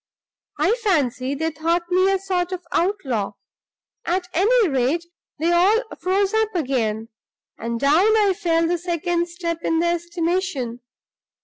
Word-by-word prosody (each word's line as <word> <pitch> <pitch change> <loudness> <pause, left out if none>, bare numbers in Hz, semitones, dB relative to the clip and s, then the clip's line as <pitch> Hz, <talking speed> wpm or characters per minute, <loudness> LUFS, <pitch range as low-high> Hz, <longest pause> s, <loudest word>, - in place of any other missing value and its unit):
I - - +2
fancy 275 - +1
they 320 +3 -1
thought 330 +3 0
me 370 +2 +4
a 390 - +2
sort 370 -2 -2
of 360 -2 -5
outlaw. 275 - -1 0.7
At 360 +1 -1
any 435 +5 +4
rate, 275 +4 0 0.3
they 325 +3 +1
all 390 +7 +4 0.2
froze 390 +2 +1
up 440 -2 +1
again; 230 -8 -1 0.5
and 230 +1 -3
down 345 - +4
I 410 -3 +3
fell 335 -3 +1
the 350 0 0
second 345 0 -1
step 340 -1 -4
in 325 - 0
their 340 +1 +2
estimation. 345 -7 -2
345 Hz, 140 wpm, -22 LUFS, 295-375 Hz, 0.7 s, me